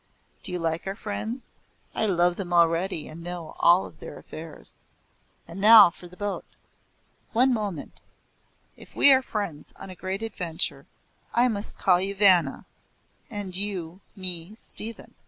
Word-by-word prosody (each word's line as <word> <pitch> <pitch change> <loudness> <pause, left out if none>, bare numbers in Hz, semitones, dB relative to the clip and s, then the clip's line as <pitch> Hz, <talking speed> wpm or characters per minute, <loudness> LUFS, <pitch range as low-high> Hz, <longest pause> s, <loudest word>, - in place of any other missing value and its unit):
Do 190 - -7
you 180 - -2
like 165 +1 -2
our 195 - -3
friends? 220 +4 -6 0.4
I 220 - 0
love 175 -2 +2
them 180 -2 -6
already, 170 0 +2
and 165 +2 -10
know 175 -1 -7
all 175 +2 +5
their 155 - -11
affairs. 160 0 -11 0.7
And 185 +4 -8
now 215 -3 +9
for 175 - -13
the 180 +1 -17
boat." 205 -1 -3 0.9
"One 255 +3 +4
moment 205 -9 -4 0.7
If - - -16
we 280 - +7
are 260 - +4
friends 200 - -5
on 190 - -10
a - - -9
great 190 +4 -4
adventure, 165 -9 -4 0.5
I 245 +1 +5
must 205 -2 -2
call 180 -2 +3
you 195 +1 -2
Vanna, 185 -8 +3 0.6
and 205 -5 -6
you 185 -3 -3
me 180 0 -2
Stephen." 225 0 -4
185 Hz, 150 wpm, -26 LUFS, 170-210 Hz, 0.9 s, now